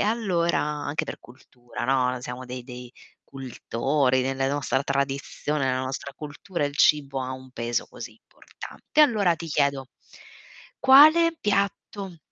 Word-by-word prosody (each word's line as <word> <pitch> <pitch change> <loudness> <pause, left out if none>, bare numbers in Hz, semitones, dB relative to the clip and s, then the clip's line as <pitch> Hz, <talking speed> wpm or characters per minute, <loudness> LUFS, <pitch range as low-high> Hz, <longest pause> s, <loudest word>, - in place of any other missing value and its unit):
allora 200 -6 +1
anche 150 +1 -2
per - - -7
cultura, 125 -1 -10
no, 125 -1 +1
siamo 125 +1 -7
dei 125 0 -7
dei 125 -1 -10 0.4
cultori. 130 +1 -1
Nelle 135 +1 -1
nostra 140 -1 -1
tradizione, 140 +1 -2
nella 130 0 0
nostra 135 +1 -5
cultura, 150 +3 -5
il 145 - -7
cibo 140 -4 +3
ha 130 0 -4
un 130 0 -10
peso 120 -1 -2
così - - -9
importante. 305 - -5
Allora 210 - +4
ti 165 - -7
chiedo 140 -3 0 0.9
quale 310 +5 +7
piatto 200 -2 -2
140 Hz, 130 wpm, -25 LUFS, 130-170 Hz, 0.9 s, quale